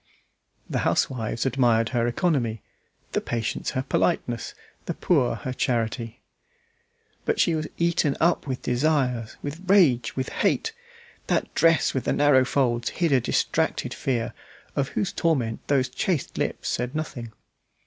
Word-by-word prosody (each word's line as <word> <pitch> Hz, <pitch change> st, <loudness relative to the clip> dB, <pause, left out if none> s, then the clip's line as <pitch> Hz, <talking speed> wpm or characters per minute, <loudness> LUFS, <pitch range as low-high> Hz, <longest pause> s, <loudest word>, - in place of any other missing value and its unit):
The -, -, -1 dB
housewives 115 Hz, -1 st, 0 dB
admired 120 Hz, -4 st, +2 dB
her 120 Hz, -2 st, +1 dB
economy, 120 Hz, -, 0 dB, 0.5 s
the -, -, 0 dB
patients 115 Hz, -2 st, -2 dB
her 130 Hz, -, 0 dB
politeness, 125 Hz, -4 st, -1 dB, 0.3 s
the -, -, -2 dB
poor 130 Hz, -9 st, +2 dB
her 125 Hz, +3 st, -5 dB
charity. 115 Hz, -2 st, -2 dB, 1.0 s
But -, -, 0 dB
she 170 Hz, -, +3 dB
was 155 Hz, -1 st, -1 dB
eaten 170 Hz, -4 st, +1 dB
up 170 Hz, -2 st, +2 dB
with 130 Hz, -2 st, -3 dB
desires, 125 Hz, -3 st, 0 dB
with 145 Hz, +4 st, -5 dB
rage, 135 Hz, -, +4 dB
with 130 Hz, 0 st, -2 dB
hate. 450 Hz, -, 0 dB, 0.5 s
That -, -, 0 dB
dress 165 Hz, -1 st, +3 dB
with 130 Hz, -, -2 dB
the -, -, +1 dB
narrow 140 Hz, -3 st, +4 dB
folds 120 Hz, -3 st, +1 dB
hid 170 Hz, -3 st, 0 dB
a 130 Hz, -2 st, +4 dB
distracted -, -, 0 dB
fear, 120 Hz, -4 st, -2 dB, 0.4 s
of 140 Hz, -1 st, +1 dB
whose 195 Hz, -, -2 dB
torment 130 Hz, -10 st, 0 dB
those 135 Hz, -3 st, +2 dB
chaste 150 Hz, +4 st, -2 dB
lips -, -, -2 dB
said 125 Hz, +4 st, -2 dB
nothing. 125 Hz, -7 st, -4 dB
130 Hz, 140 wpm, -25 LUFS, 120-155 Hz, 1.0 s, rage